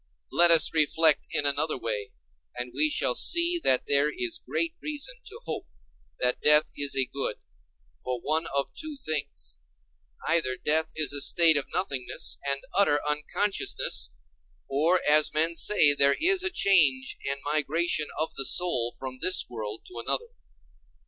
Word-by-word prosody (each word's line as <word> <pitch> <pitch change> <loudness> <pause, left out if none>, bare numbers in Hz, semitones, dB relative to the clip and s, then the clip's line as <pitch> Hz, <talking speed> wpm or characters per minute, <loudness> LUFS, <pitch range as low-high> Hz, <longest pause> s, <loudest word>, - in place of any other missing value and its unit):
Let 175 0 +5
us 165 -1 +6
reflect 160 0 +2
in 145 - -3
another 145 +2 0
way, 105 -4 -5 0.4
and 125 0 -6
we 150 +4 +2
shall 125 - 0
see 340 - +4
that 130 - +2
there 145 +1 +2
is 345 -2 -5
great 330 -1 -2
reason 300 - -5
to 455 +3 -10
hope - - -6 0.5
that 125 0 -1
death 150 0 +4
is 145 -1 -2
a 135 - +2
good, 135 -4 -3 0.7
for 125 -1 -4
one 160 +5 -2
of 140 0 -3
two 310 -2 -8
things: 155 - -5 0.7
either 155 -6 0
death 160 +1 0
is 155 -3 0
a 145 - +1
state 165 +2 +4
of 145 - -2
nothingness 140 -9 -3
and 140 0 -3
utter 170 -8 +3
unconsciousness, 150 +7 -2 0.6
or, 160 +7 +1
as 150 0 +3
men 165 +2 +2
say, 165 -4 +4
there 140 0 +3
is 370 +3 +3
a 365 - +1
change 160 - +2
and 140 0 -4
migration 155 +1 0
of 155 - -2
the 135 - -2
soul 125 -10 +2
from 130 -1 -8
this 185 - +2
world 110 -2 -7
to 120 - -10
another. 470 - -2
150 Hz, 155 wpm, -26 LUFS, 135-175 Hz, 0.7 s, us